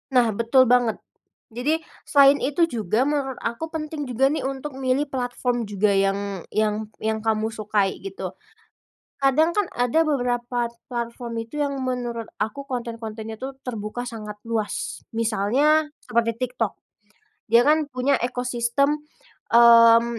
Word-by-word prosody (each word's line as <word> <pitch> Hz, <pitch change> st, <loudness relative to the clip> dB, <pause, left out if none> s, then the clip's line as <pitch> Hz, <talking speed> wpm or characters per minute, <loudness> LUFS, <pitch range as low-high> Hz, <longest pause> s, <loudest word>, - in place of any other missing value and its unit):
Nah, 245 Hz, -2 st, +5 dB
betul 235 Hz, +3 st, +5 dB
banget. 245 Hz, -2 st, +3 dB, 0.5 s
Jadi, 295 Hz, +8 st, 0 dB, 0.3 s
selain 280 Hz, -1 st, +6 dB
itu 290 Hz, +5 st, 0 dB
juga, 220 Hz, 0 st, 0 dB
menurut 275 Hz, -3 st, -1 dB
aku 235 Hz, +7 st, -3 dB
penting 305 Hz, -2 st, -4 dB
juga 250 Hz, +2 st, +1 dB
nih 305 Hz, -, -2 dB
untuk 270 Hz, +2 st, -4 dB
milih 270 Hz, +2 st, 0 dB
platform 245 Hz, -2 st, -2 dB
juga 205 Hz, +1 st, +1 dB
yang 195 Hz, -1 st, 0 dB
yang 215 Hz, 0 st, 0 dB, 0.2 s
yang 220 Hz, 0 st, 0 dB
kamu 220 Hz, 0 st, +1 dB
sukai, 210 Hz, -2 st, 0 dB
gitu. 390 Hz, 0 st, -6 dB, 0.9 s
Kadang 305 Hz, +5 st, +4 dB
kan 415 Hz, -2 st, +1 dB
ada 245 Hz, +6 st, +2 dB
beberapa 245 Hz, -5 st, -1 dB, 0.3 s
platform 235 Hz, 0 st, -4 dB
itu 295 Hz, +6 st, -6 dB
yang 280 Hz, -1 st, -1 dB
menurut 240 Hz, -2 st, -3 dB, 0.2 s
aku 275 Hz, +6 st, -4 dB
konten-kontenya 225 Hz, -3 st, -5 dB
tuh 265 Hz, +3 st, -5 dB
terbuka 225 Hz, -1 st, -5 dB
sangat 215 Hz, -3 st, -7 dB
luas, 210 Hz, -6 st, -3 dB
misalnya 235 Hz, +8 st, +2 dB, 0.2 s
seperti 230 Hz, +1 st, +1 dB
TikTok. 245 Hz, -4 st, -1 dB, 0.8 s
Dia 235 Hz, +1 st, +6 dB
kan 305 Hz, -1 st, +3 dB
punya 255 Hz, +2 st, +1 dB
ekosistem, 250 Hz, +4 st, 0 dB, 0.5 s
mmm, 230 Hz, 0 st, +8 dB
245 Hz, 130 wpm, -24 LUFS, 225-275 Hz, 0.9 s, mmm